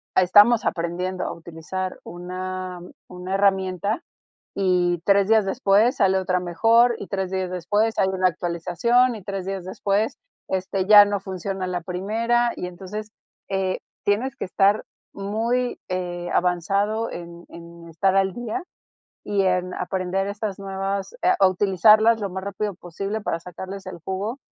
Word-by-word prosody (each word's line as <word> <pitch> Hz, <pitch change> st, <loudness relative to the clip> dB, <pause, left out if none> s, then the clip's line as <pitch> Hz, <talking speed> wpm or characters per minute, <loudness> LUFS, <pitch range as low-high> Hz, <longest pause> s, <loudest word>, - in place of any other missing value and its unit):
ah, -, -, +6 dB
estamos 205 Hz, +5 st, +6 dB
aprendiendo 180 Hz, +2 st, -2 dB
a -, -, -3 dB
utilizar 170 Hz, +3 st, -6 dB
una 185 Hz, +1 st, -6 dB, 0.3 s
una 180 Hz, +1 st, -6 dB
herramienta, 195 Hz, -, +1 dB, 0.6 s
y 180 Hz, -3 st, +2 dB
3 200 Hz, -1 st, +4 dB
días 220 Hz, -1 st, +4 dB
después 200 Hz, +5 st, +3 dB
sale 190 Hz, -3 st, +3 dB
otra 185 Hz, -1 st, 0 dB
mejor, 230 Hz, +7 st, +3 dB
y -, -, -7 dB
3 190 Hz, -2 st, -3 dB
días 190 Hz, -1 st, -2 dB
después 205 Hz, +6 st, 0 dB
hay 190 Hz, -, +3 dB
una 185 Hz, -1 st, +1 dB
actualización, 180 Hz, +9 st, +1 dB
y 215 Hz, -, -9 dB
3 195 Hz, -1 st, -5 dB
días 195 Hz, -2 st, -4 dB
después, 200 Hz, +3 st, -1 dB, 0.3 s
este, 190 Hz, 0 st, -1 dB
ya 205 Hz, 0 st, +10 dB
no 205 Hz, -1 st, -2 dB
funciona 190 Hz, 0 st, -4 dB
la 180 Hz, -1 st, -3 dB
primera, 225 Hz, +7 st, 0 dB
y -, -, -4 dB
entonces, 195 Hz, +4 st, -7 dB, 0.4 s
eh, 190 Hz, -1 st, -1 dB, 0.3 s
tienes 230 Hz, +6 st, 0 dB
que -, -, -4 dB
estar 195 Hz, +3 st, +2 dB, 0.3 s
muy, 230 Hz, +5 st, -1 dB
eh, 175 Hz, -1 st, -3 dB
avanzado 200 Hz, +5 st, +1 dB
en 170 Hz, 0 st, -9 dB
en 170 Hz, 0 st, -12 dB
estar 185 Hz, +4 st, +1 dB
al 195 Hz, -1 st, +2 dB
día 240 Hz, -, -4 dB, 0.6 s
y 205 Hz, -1 st, +1 dB
en 180 Hz, -1 st, 0 dB
aprender 190 Hz, +1 st, -2 dB
estas 205 Hz, -1 st, -4 dB
nuevas 195 Hz, -, -3 dB
eh, 365 Hz, -, +5 dB
a 195 Hz, -, +6 dB
utilizarlas 210 Hz, +4 st, +4 dB
lo 200 Hz, -, -2 dB
más 190 Hz, +1 st, -5 dB
rápido 200 Hz, +1 st, -3 dB
posible 195 Hz, +4 st, -5 dB
para 165 Hz, -, -2 dB
sacarles 190 Hz, +3 st, -8 dB
el 185 Hz, -2 st, -8 dB
jugo, 205 Hz, +7 st, -3 dB
190 Hz, 150 wpm, -23 LUFS, 180-205 Hz, 0.6 s, ya